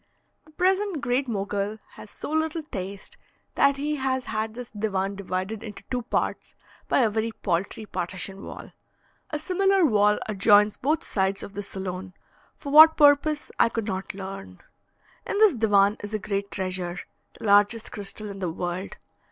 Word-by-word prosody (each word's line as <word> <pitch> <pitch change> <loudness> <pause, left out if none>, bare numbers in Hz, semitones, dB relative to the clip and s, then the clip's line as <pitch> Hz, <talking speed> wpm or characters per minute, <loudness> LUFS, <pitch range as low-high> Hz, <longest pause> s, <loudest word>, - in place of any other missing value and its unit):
The 310 - -19
present 380 0 +1
Great 255 +2 0
Mogul 205 -1 -2
has 210 - -12
so - - -7
little 315 +1 -1
taste, 195 -7 -7 0.4
that 280 0 +3
he 300 +2 -2
has 260 -1 -1
had 220 0 -3
this 245 -1 -8
divan 200 -2 -2
divided 195 +2 -4
into 210 -3 -9
two 250 -1 0
parts 230 - -2 0.3
by - - +3
a 230 - +3
very 220 +1 -1
paltry 200 +2 -2
partition 190 +1 -5
wall. - - -9 0.6
A 300 - -2
similar 380 +3 +2
wall 210 -5 +4
adjoins 210 0 +4
both 300 +4 0
sides 195 0 -1
of 200 - -9
the 205 - -4
saloon, 190 -2 -6 0.4
for 280 - -7
what 315 +2 +9
purpose 290 0 +4
I 230 - +5
could 225 -2 -3
not 190 -1 -4
learn. 190 - -8 0.7
In - - -2
this 430 -2 +6
divan 205 -3 +3
is 205 +1 -5
a - - +2
great 200 -1 -3
treasure: 185 -2 -3 0.4
the - - -12
largest 205 +2 +3
crystal 205 +1 -4
in 195 - -9
the 180 -3 -2
world. 175 +3 -4
210 Hz, 165 wpm, -25 LUFS, 195-275 Hz, 0.7 s, what